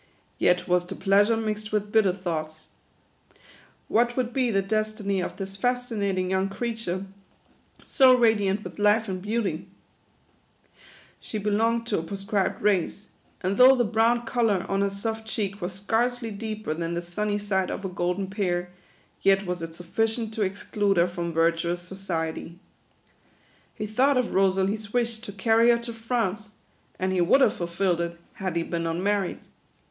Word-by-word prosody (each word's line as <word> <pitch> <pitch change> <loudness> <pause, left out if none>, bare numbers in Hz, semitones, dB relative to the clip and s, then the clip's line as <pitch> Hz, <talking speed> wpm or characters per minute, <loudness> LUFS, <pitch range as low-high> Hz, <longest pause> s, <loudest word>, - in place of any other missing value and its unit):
Yet 180 0 +2
was 180 0 +2
the - - -5
pleasure 205 +3 +3
mixed 215 -1 -3
with 210 -1 -1
bitter 215 -4 +4
thoughts. 160 -4 -5 1.2
What 240 +2 +2
would 250 -2 -1
be 255 -2 +1
the 195 -3 +1
des 215 +2 0
tiny 200 -3 -1
of 180 - -5
this 195 -1 -4
fascinatkfg 210 -6 -1
young 190 +1 0
creature, 195 -3 -3 0.8
so 260 -3 +5
radiant 210 -4 +2
with - - -9
life 210 +2 +3
and 185 -1 -4
beauty? 200 -5 -2 1.5
She 215 - -6
belonged 225 +3 +1
to 215 -5 0
a - - -2
proscribed 195 +3 -2
race; 205 0 0 0.3
and 190 +1 -1
though 255 +1 +8
the 245 - +2
brown 230 +2 +2
colour 225 -6 +1
on 195 0 0
her 200 - +2
soft 220 +3 -4
cheek 200 -2 -3
was 175 +2 -3
scarcely 230 +4 -1
deeper 215 -4 -4
than 165 +1 -3
the 170 - -3
sunny 205 +4 -2
side 195 -2 -1
of 195 - -4
a - - 0
golden 180 +1 -1
pear, 180 -3 -2 0.5
yet 195 0 +3
was 180 -1 -3
it 165 0 -6
sufficient 225 +6 -1
to 220 - -3
exclude 200 0 0
her 170 +1 +4
from 175 -1 -4
virtuous 170 +1 +1
so 185 +2 -9
ciety. 170 -3 -4 1.2
He 215 - -4
thought 255 +6 +2
of 250 -2 0
Rosalie's 195 +2 +1
wish 235 -2 0
to 220 -2 -8
carry 225 +4 +3
her 235 - +5
to 235 0 -7
France: 225 -3 -2 0.4
and 185 0 -1
he 180 - +2
would 195 +11 +4
have 225 - +5
fulfilled 175 -1 -1
it, 170 0 -4
had 185 -3 -4
he 170 - +1
been 165 0 -3
unmarried. 190 +3 0
200 Hz, 165 wpm, -26 LUFS, 180-225 Hz, 1.5 s, though